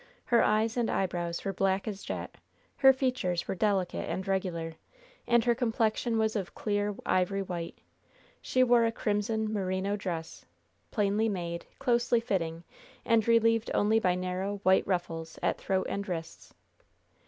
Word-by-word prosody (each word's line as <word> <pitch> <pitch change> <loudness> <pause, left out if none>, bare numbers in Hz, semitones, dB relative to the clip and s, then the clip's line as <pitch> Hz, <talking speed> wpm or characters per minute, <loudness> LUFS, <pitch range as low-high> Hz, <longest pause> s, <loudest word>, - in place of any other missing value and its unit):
Her 235 - +4
eyes 220 +2 +2
and 235 -2 +1
eyebrows 175 -2 -2
were 195 - -1
black 195 +2 0
as 200 -2 -4
jet; - - -5 0.4
her 270 -1 +8
features 255 -10 -1
were - - -1
delicate 190 -1 0
and 190 +1 -3
regular; 180 -4 -2 0.5
and 235 -1 +4
her 240 - +4
complexion 225 0 0
was 220 0 +1
of 195 -4 -1
a - - -19
clear, 205 -1 -1
ivory 190 +2 +1
white. 175 -3 -5 0.6
She 255 - +2
wore 240 -1 +5
a 230 - +2
crimson, 220 0 -1
merino 190 0 -1
dress, 170 -5 -5 0.5
plainly 210 +1 +1
made, 170 -3 -4
closely 240 -2 +2
fitting, 170 -7 -2 0.4
and 230 -1 +3
relieved 230 -1 +3
only 215 +2 +3
by 180 -4 +2
narrow, 185 +2 -3
white 190 0 +4
ruffles 165 -3 -3
at - - +1
throat 190 -1 0
and 200 0 -4
wrists. 165 -2 -6
200 Hz, 155 wpm, -29 LUFS, 185-225 Hz, 0.6 s, her